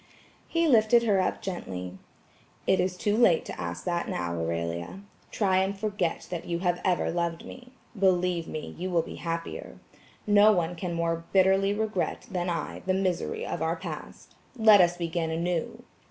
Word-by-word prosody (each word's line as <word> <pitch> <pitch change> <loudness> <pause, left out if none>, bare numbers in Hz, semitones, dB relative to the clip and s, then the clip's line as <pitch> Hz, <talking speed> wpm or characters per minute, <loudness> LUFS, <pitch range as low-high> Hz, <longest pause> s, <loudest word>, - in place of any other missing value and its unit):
He 335 0 +1
lifted 235 -2 +5
her 200 -4 +3
up - - -2
gently. 95 - -5 0.7
"It 190 - +3
is 180 0 0
too 205 +2 +1
late 205 -8 +4
to - - -7
ask 85 0 -5
that 175 -1 -2
now, 85 -1 -2
Aurelia. 85 - -3 0.3
Try 190 -3 +1
and 190 +1 0
forget 200 -5 -2
that 175 -2 -4
you 170 - -1
have 175 0 0
ever 180 -2 +1
loved 170 -1 -2
me. 250 0 -12 0.2
Believe 180 -3 +1
me, 155 - -6
you 185 +1 -2
will 170 -2 +2
be - - -9
happier. 165 0 -5 0.5
No 205 +1 +6
one 175 -2 0
can 175 0 -4
more 165 0 -1
bitterly 195 +1 +4
regret 210 -3 -2
than 180 -1 -1
I 170 - -3
the 185 - +2
misery 195 - -1
of - - -4
our - - 0
past. - - -8 0.2
Let 215 -3 +7
us 175 0 +3
begin 170 -1 -2
anew." 175 +8 -2
180 Hz, 170 wpm, -27 LUFS, 165-200 Hz, 0.7 s, Let